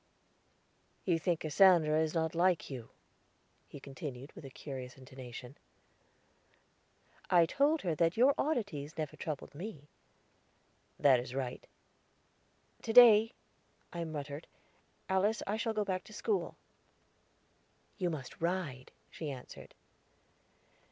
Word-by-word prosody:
"You 170 -3 +2
think 170 -1 0
Cassandra 160 -2 +5
is 160 +1 -1
not 160 -1 0
like 170 -3 +1
you," 125 -4 -7 0.8
he - - -10
continued 135 0 -8
with - - -12
a 135 - -8
curious 130 -2 -8
intonation. 130 0 -10 1.7
"I 175 -2 +6
told 285 - +1
her 175 -4 0
that 165 +3 +1
your 260 +4 +6
oddities 200 - -2
never 155 -2 -4
troubled 150 -4 -6
me." 150 -3 -8 1.1
"That 135 -3 +5
is 125 +1 -7
right." 130 -2 -4 1.1
"To 225 - -3
day," 225 -2 +8 0.6
I 170 -1 -3
muttered, 145 -1 -6 0.6
"Alice, 195 +4 +1
I 205 - -1
shall 225 +1 -1
go 210 -1 -1
back 185 -1 -2
to 215 - -13
school." 415 - -2 1.4
"You 180 -2 +1
must 140 -5 -7
ride," 165 -7 -2 0.2
she 155 - -5
answered. 130 -3 -10
160 Hz, 120 wpm, -33 LUFS, 140-190 Hz, 1.7 s, day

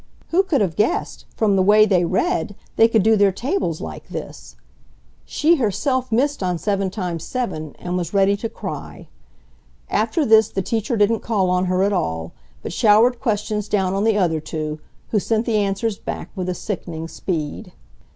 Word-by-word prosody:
Who 355 +3 +4
could 360 - 0
have 180 -6 0
guessed, 210 +5 -1
from 210 -3 +2
the 190 - +3
way 210 +3 +6
they 185 -4 +2
read, 185 +1 0 0.2
they 225 - +6
could 225 -3 +2
do 220 +1 +5
their 200 -2 +4
tables 195 - -2
like - - -7
this! - - -8 0.7
She 330 +3 +2
herself 255 +2 0
missed 275 +4 +1
on 180 -2 0
7 195 +2 -1
x 175 -4 -3
7 185 - -4
and 180 0 -4
was 175 -2 -3
ready 200 0 +3
to 225 +2 -4
cry. - - -7 0.8
After 230 +8 +1
this 220 -2 +6
the 195 - -3
teacher 225 +2 -1
didn't 210 +2 +3
call 195 -5 0
on 180 0 +1
her 185 +1 +1
at 200 +1 +1
all, 80 - -2 0.3
but - - -5
showered 225 +5 +4
questions 210 -2 -1
down 190 -3 +1
on 195 +1 0
the 220 -1 +3
other 170 -5 +1
two, 155 0 -5 0.3
who 215 - +2
sent 225 +3 0
the 225 -3 +1
answers 200 +1 -1
back - - -6
with 185 -2 -2
sickening 165 -5 -5
speed. 160 -2 -4
200 Hz, 180 wpm, -21 LUFS, 180-225 Hz, 0.8 s, way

